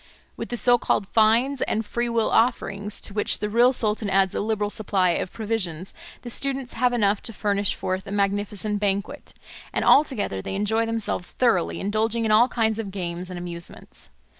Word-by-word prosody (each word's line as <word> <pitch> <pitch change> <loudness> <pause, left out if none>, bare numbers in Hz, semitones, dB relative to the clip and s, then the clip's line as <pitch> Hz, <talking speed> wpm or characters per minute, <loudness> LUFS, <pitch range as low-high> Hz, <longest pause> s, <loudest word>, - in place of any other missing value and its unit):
With - - -6
the 240 - -1
so 245 0 +4
called 200 - 0
fines 235 +5 +3
and 220 0 -1
free 240 +3 -2
will 230 -2 0
offerings, 210 -3 0
to 205 - -5
which 210 - +1
the 210 0 -3
real 240 +3 +5
sultan 215 -4 -1
adds 190 -1 +2
a - - -2
liberal 210 -1 -1
supply 195 -5 +1
of 180 - -2
provisions, 195 -6 -3 0.3
the 240 - -6
students 270 0 -1
have 250 +1 +2
enough 210 -4 +1
to 230 - -5
furnish 200 -2 0
forth 185 +1 -3
a - - -6
magnificent 205 +1 -1
banquet; 200 +7 -3 0.4
and - - -1
altogether 240 - +3
they 195 - -5
enjoy 220 +3 0
themselves 225 -5 -2
thoroughly, 230 -9 +1
indulging 220 +3 0
in 215 - +1
all 225 +3 +6
kinds 220 -3 0
of 215 -3 -4
games 180 -2 -5
and 180 - -6
amusements. 175 -1 -7
210 Hz, 185 wpm, -24 LUFS, 195-230 Hz, 0.4 s, all